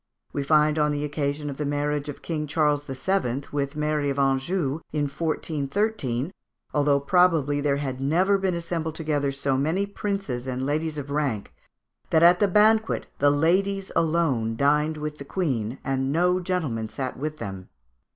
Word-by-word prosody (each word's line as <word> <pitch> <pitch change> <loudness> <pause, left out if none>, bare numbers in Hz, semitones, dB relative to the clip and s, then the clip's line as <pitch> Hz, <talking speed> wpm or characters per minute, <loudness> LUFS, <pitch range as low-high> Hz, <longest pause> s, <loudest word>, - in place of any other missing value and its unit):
We 145 - -1
find 150 +1 +3
on 150 0 +3
the 145 0 -2
occasion 145 0 -2
of 140 -2 -5
the 150 - -2
marriage 145 0 -1
of 145 - -8
King 155 -3 -3
Charles 150 -1 +1
VII. 135 -1 -1
with 140 0 -2
Mary 150 -1 0
of 140 - -2
Anjou, 135 +3 +1
in 150 -1 0
1413, 155 - -1 0.4
although 145 -1 +3
probably 150 -2 +3
there 140 -1 +1
had 135 -2 -4
never 185 +8 +3
been 190 -2 0
assembled 165 -2 -3
together 150 -3 0
so 135 -1 -1
many 165 +8 +1
princes 195 -11 -3
and 130 0 -2
ladies 155 +2 -1
of 140 -1 -5
rank, 140 -8 -1 0.6
that 160 - +4
at 175 +1 +7
the 205 - +4
banquet 215 +3 +3
the 145 - +5
ladies 190 +6 +1
alone 155 -9 +1
dined 150 +4 +2
with 150 0 -5
the - - -6
Queen, 135 - -2
"and 135 0 -1
no 180 +4 +2
gentlemen 155 -12 -2
sat 130 +3 -4
with 155 +3 -4
them." 95 -8 -7
150 Hz, 165 wpm, -25 LUFS, 140-165 Hz, 0.6 s, at